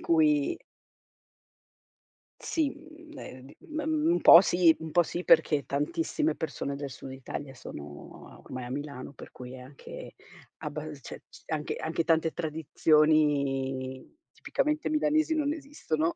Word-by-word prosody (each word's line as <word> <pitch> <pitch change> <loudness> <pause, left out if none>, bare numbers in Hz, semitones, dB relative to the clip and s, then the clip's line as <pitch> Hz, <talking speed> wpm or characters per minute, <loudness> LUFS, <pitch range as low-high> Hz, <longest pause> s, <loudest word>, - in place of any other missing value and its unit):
cui 150 -3 +3 1.8
Sì, 315 -4 0
mhmm, 315 0 -14
ehm, 130 +1 -10
d - - -16
m 310 0 -2 0.3
un 350 - +2
po' 170 - +10
sì, 175 -3 +4
un 160 - -6
po' 175 +3 +4
sì, 175 +3 -4
perché 150 -3 +4
tantissime 300 - -1
persone 145 -3 -4
del 140 0 -5
Sud 130 +1 -9
Italia 135 +1 -7
sono, 75 - -11
ormai, 130 -1 -7
a 120 - -8
Milano, 140 -1 -6
per 135 - -12
cui 125 +1 -10
anche 135 +2 -10 0.4
abbal 150 0 -6
ce - - -9
c - - -16
anche 155 -2 -3
anche 160 +1 -1
tante 160 -1 +2
tradizioni 150 - +1
tipicamente 300 +1 -1
milanesi 310 +1 +2
non 295 -1 +1
esistono. 270 - -2
155 Hz, 135 wpm, -29 LUFS, 135-200 Hz, 1.8 s, po